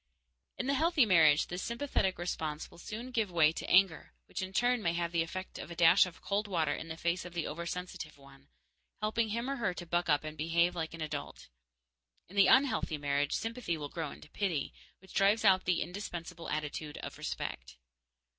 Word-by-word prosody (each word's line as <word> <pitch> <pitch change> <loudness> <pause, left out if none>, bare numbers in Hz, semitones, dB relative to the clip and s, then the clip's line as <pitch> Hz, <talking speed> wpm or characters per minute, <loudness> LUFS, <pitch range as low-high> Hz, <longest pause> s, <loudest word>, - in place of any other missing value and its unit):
In - - -2
the 275 - +1
healthy 315 -1 +4
marriage, 160 -6 +5
this 180 +1 -5
sympathetic 235 -5 -1
response 160 -3 -3
will - - -15
soon 230 +7 -6
give 225 -5 0
way 160 -3 +4
to - - -6
anger, 185 -2 +4
which - - -5
in 190 0 -4
turn 245 +4 +2
may 170 -4 +1
have 170 0 -1
the 170 -1 +2
effect 185 +3 -5
of - - -7
a 170 - -7
dash 170 +3 +6
of 175 - -12
cold 205 +1 0
water 160 -6 +1
in 165 - -6
the 160 0 -6
face 170 +2 0
of 175 0 -10
the 170 - -1
oversensitive 170 -1 -5
one, 140 0 -18 0.5
helping 220 +1 0
him 235 +4 -2
or 275 0 -2
her 190 -6 -1
to 175 - -6
buck 175 0 0
up 145 0 +3
and 155 0 -7
behave 170 +3 +2
like 165 -1 -3
an 165 - -9
adult. 155 - -5 0.8
In 190 - -14
the 200 -1 +6
unhealthy 255 - +3
marriage, 145 0 0
sympathy 225 -7 -2
will 145 -1 -5
grow 160 -2 -4
into 150 - -13
pity, 175 -9 -1 0.2
which 190 0 -17
drives 205 +3 +3
out 185 -2 +5
the 180 -1 +2
indispensable 175 -2 -6
attitude 150 0 -4
of - - -7
respect. - - -5
175 Hz, 200 wpm, -32 LUFS, 160-200 Hz, 0.8 s, dash